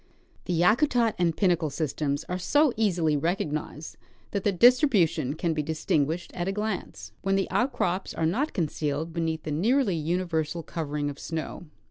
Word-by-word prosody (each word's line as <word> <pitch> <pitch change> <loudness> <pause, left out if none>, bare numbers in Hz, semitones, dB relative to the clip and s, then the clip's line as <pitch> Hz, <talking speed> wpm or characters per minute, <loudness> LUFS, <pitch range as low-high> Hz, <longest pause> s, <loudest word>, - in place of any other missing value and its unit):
The 175 -3 -1
Yakutat 230 - +3
and 170 -3 +1
Pinnacle 175 -5 +2
systems 145 -1 -2
are 180 +1 -4
so 290 - +3
easily 180 -8 +1
recognized 155 -1 -3 0.3
that 200 -2 -2
their 205 - +3
distribution 185 - +4
can 165 +1 -1
be 155 - -1
distinguished 155 +1 -1
at 175 0 -3
a - - +1
glance, 195 - -4
when 195 0 +1
the 195 -1 +1
outcrops 195 -8 0
are 160 - 0
not 255 - 0
concealed 155 -1 -2
beneath 160 -1 -2
the 155 - -4
nearly 210 - +2
universal 165 0 -1
covering 150 -3 -3
of 140 - -11
snow. 165 +1 -5
170 Hz, 155 wpm, -27 LUFS, 155-195 Hz, 0.3 s, distribution